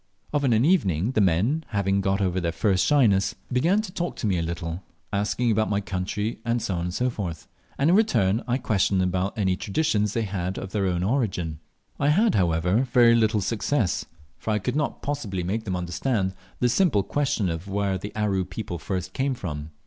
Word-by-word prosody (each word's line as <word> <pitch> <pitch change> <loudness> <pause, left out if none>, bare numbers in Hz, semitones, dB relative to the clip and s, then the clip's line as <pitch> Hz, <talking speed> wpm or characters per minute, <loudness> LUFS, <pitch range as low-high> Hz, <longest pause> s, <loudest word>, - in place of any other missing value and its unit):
Of 145 -1 +1
an 120 -2 +3
evening 105 - +2
the 110 - +2
men, 100 - +2
having 100 -3 0
got 95 +1 0
over 90 -1 0
their 85 -1 0
first 90 +3 +1
shyness, 110 -10 +3 0.2
began 175 +12 +3
to 185 - -7
talk 175 -2 -3
to - - -4
me 95 -4 +1
a - - 0
little, 85 +1 -4 0.3
asking 105 +4 +1
about 110 0 +1
my 100 -1 +1
country, 105 +3 -3 0.2
&c., 105 -4 -2
and 90 +1 -2 0.5
in - - +5
return 120 - +2
I 125 +1 +1
questioned 100 -5 +1
them 90 0 +2
about 95 +3 -2
any 95 -3 +1
traditions 105 -1 0
they 115 - 0
had 95 -2 -3
of 95 - -6
their 100 -2 0
own 90 -1 0
origin. 95 - -1 0.4
I 140 - +2
had, 205 +10 +4
however, 90 +5 +2
very 120 -1 +6
little 110 -2 +3
success, 110 +1 0 0.3
for - - -5
I 105 - +2
could 115 +6 -2
not 150 0 -2
possibly 105 -11 -3
make 110 +6 -2
them 95 -3 -2
understand 95 +3 -1 0.3
the 125 - +4
simple 135 - +3
question 145 -7 0
of 85 +2 -4
where 100 -1 -1
the 105 +3 -6
Aru 100 -3 +1
people 90 -4 -6
first 90 +1 -4
came 135 0 0
from. 75 -8 -5
100 Hz, 190 wpm, -25 LUFS, 90-120 Hz, 0.5 s, very